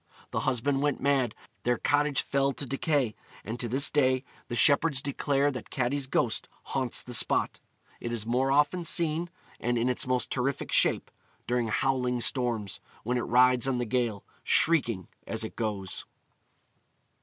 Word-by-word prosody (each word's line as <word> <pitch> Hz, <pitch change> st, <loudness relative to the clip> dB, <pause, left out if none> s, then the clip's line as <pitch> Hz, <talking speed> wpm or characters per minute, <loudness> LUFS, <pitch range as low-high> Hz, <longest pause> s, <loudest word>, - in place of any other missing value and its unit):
The -, -, -1 dB
husband 135 Hz, +2 st, 0 dB
went 145 Hz, 0 st, 0 dB
mad; 135 Hz, -5 st, +1 dB, 0.3 s
their 120 Hz, 0 st, +1 dB
cottage 145 Hz, -1 st, +2 dB
fell 140 Hz, 0 st, +1 dB
to 140 Hz, -, -5 dB
decay; 135 Hz, -3 st, 0 dB, 0.3 s
and 115 Hz, +3 st, -5 dB
to 120 Hz, -, 0 dB
this 135 Hz, +5 st, +2 dB
day 130 Hz, -3 st, +2 dB, 0.2 s
the 120 Hz, -, -4 dB
shepherds 140 Hz, +5 st, +4 dB
declare 140 Hz, +1 st, 0 dB
that 125 Hz, -4 st, -7 dB
Catti's 130 Hz, +1 st, -1 dB
ghost 115 Hz, -3 st, 0 dB
haunts 130 Hz, -3 st, -2 dB
the 125 Hz, -, -6 dB
spot. -, -, +2 dB, 0.4 s
It 120 Hz, -, -4 dB
is 115 Hz, -3 st, -2 dB
most 130 Hz, +3 st, +1 dB
often 150 Hz, +5 st, +2 dB
seen, 165 Hz, 0 st, +1 dB, 0.3 s
and 120 Hz, 0 st, 0 dB
in 120 Hz, +2 st, +1 dB
its 125 Hz, -, 0 dB
most 125 Hz, -1 st, 0 dB
terrific 135 Hz, +1 st, -1 dB
shape, -, -, +2 dB, 0.3 s
during 120 Hz, -1 st, 0 dB
howling 125 Hz, +1 st, 0 dB
storms, 115 Hz, -7 st, -1 dB, 0.2 s
when 125 Hz, +2 st, 0 dB
it -, -, -4 dB
rides 125 Hz, +1 st, +4 dB
on 130 Hz, -2 st, +1 dB
the 120 Hz, -, -1 dB
gale, 115 Hz, -3 st, -1 dB, 0.2 s
shrieking 120 Hz, -, +2 dB, 0.2 s
as -, -, -1 dB
it -, -, -6 dB
goes. 100 Hz, -4 st, -3 dB
125 Hz, 160 wpm, -28 LUFS, 120-140 Hz, 0.4 s, shepherds